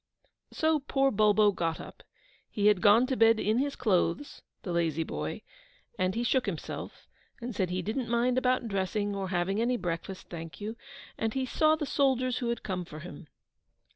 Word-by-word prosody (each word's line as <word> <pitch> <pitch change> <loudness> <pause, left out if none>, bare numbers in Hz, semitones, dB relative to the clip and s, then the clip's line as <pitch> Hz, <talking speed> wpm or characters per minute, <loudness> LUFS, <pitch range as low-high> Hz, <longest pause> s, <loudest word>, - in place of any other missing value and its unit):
So 315 -1 +2
poor 270 -1 +1
Bulbo 210 0 +4
got 165 -4 -2
up: - - -10 0.5
he 205 - -2
had 210 -3 +5
gone 215 +4 +6
to 260 0 -1
bed 225 -1 +5
in 215 +3 +1
his 280 +1 -1
clothes 210 - 0 0.2
(the 185 - -4
lazy 165 -2 0
boy), - - -5 0.5
and 185 0 0
he 235 - 0
shook 255 0 +1
himself, 170 -6 -6 0.3
and 240 -1 -6
said 185 -3 0
he 180 0 -2
didn't 230 +5 -2
mind 240 +1 +2
about 255 -1 +1
dressing, 205 +1 -1
or 195 -1 -3
having 190 +3 0
any 245 +1 +1
breakfast, 175 0 -5
thank 165 -4 -8
you; 215 +2 -5 0.4
and 225 +2 -1
he 265 -1 0
saw 310 +4 +3
the 310 -1 -3
soldiers 260 -3 +1
who 240 - -2
had 235 - -2
come 185 -2 -3
for 155 -2 -10
him. 175 -1 -10
215 Hz, 185 wpm, -29 LUFS, 185-250 Hz, 0.5 s, gone